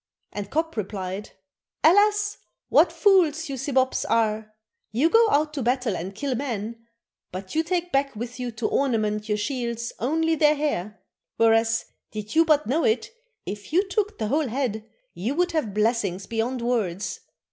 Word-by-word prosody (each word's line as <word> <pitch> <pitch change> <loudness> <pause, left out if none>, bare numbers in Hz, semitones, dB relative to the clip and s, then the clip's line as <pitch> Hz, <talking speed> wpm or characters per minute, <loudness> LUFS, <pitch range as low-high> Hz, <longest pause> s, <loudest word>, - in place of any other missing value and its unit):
and 205 -1 -5
Kop 320 +2 -1
replied, 195 -1 -4 0.5
'Alas, 415 +4 +4 0.3
what - - +5
fools 340 -6 +3
you 275 - -3
Sibops 265 -1 +1
are! 220 -1 +1 0.4
You 275 +10 +2
go 455 -1 +6
out 300 -1 +2
to 285 - -3
battle 245 -3 0
and 185 +3 -5
kill 280 +2 -2
men, 230 -3 -4 0.4
but 185 +1 -7
you 320 - +3
take 350 +1 -2
back 275 -2 +1
with 240 +3 -6
you 250 -1 -2
to 220 0 -2
ornament 215 -5 0
your 210 - +1
shields 235 0 -3
only 320 +6 +1
their 300 -1 +4
hair; 220 -9 -2 0.4
whereas, 225 0 +3 0.2
did 215 -1 -6
you 325 +1 +5
but 305 -1 +3
know 300 +7 +1
it, 445 0 +1 0.3
if 205 +5 -7
you 375 +5 +3
took 415 +2 -1
the 215 - -2
whole 300 +2 +1
head 225 -3 -3 0.2
you 230 +10 -2
would 355 +2 +1
have 305 -10 -1
blessings 210 -3 0
beyond 235 +2 -2
words. 210 -6 -1
245 Hz, 165 wpm, -25 LUFS, 215-310 Hz, 0.5 s, go